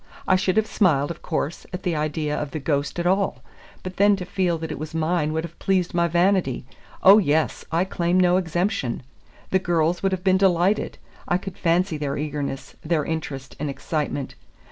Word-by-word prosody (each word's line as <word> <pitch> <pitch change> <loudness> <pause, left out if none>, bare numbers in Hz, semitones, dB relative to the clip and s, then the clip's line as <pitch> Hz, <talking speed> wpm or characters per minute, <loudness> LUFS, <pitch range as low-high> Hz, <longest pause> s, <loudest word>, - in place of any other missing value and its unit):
I 185 - +5
should 185 +1 +1
have 220 - +4
smiled, 160 -9 +2
of 170 - -9
course, 155 -1 -3
at 180 0 -6
the 175 -3 0
idea 150 0 -1
of 150 - -3
the 155 - -4
ghost 140 +1 -1
at 175 - -2
all, 195 +2 +1 0.4
but 185 0 -7
then 205 +1 +5
to 185 -2 -6
feel 180 -2 0
that 160 0 -5
it - - -5
was 155 +1 -6
mine 160 -1 +1
would 160 +1 -1
have 170 0 -9
pleased 185 -2 +1
my 170 0 +2
vanity. 175 -6 +1 0.4
Oh, 195 +3 +9
yes, 160 -4 +1
I 165 +2 +2
claim 175 -1 +1
no 180 0 +4
exemption. 175 - -1 0.5
The 190 - +4
girls 170 -1 +1
would 195 - +1
have 185 -1 -2
been 190 -1 +4
delighted. 190 +1 +2 0.3
I 175 - +2
could 190 0 -8
fancy 170 0 +1
their 145 -1 -2
eagerness, 140 -2 -4
their 155 -2 0
interest, 135 -6 -5
and 150 0 -2
excitement. 145 -1 -3
170 Hz, 195 wpm, -23 LUFS, 150-185 Hz, 0.5 s, Oh